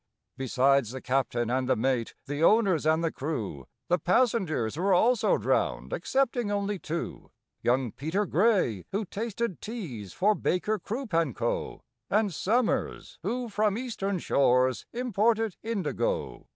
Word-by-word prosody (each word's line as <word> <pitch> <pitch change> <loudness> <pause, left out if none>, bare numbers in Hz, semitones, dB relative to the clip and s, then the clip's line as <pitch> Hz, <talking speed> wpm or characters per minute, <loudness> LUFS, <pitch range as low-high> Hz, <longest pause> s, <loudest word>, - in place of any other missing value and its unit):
Besides 135 -1 +2
the 130 - -5
captain 125 -2 0
and 130 0 0
the - - +4
mate, 120 0 0
the 145 +3 -2
owners 190 -6 +4
and 160 +1 +3
the 165 - +1
crew, 110 - -4 0.2
The 175 +1 +2
passengers 180 - +1
were 185 +3 +2
also 235 +5 +3
drowned - - 0
excepting 265 - 0
only 200 -1 -1
two: 170 +1 -5 0.3
Young 125 -1 +1
PETER 165 - -1
GRAY, 180 - +2
who 205 +2 -1
tasted 225 0 -3
teas 150 - -6
for 210 +3 +3
BAKER, 210 +2 0
CROOP, 235 -2 -5
AND 165 -7 +1
CO., - - -2 0.3
And 210 -2 +2
SOMERS, 230 +8 -1
who 250 0 -2
from 210 -1 +1
Eastern 210 -6 -2
shores 130 -5 +2
imported 225 -3 +1
indigo. 230 - -2
185 Hz, 140 wpm, -28 LUFS, 135-220 Hz, 0.3 s, the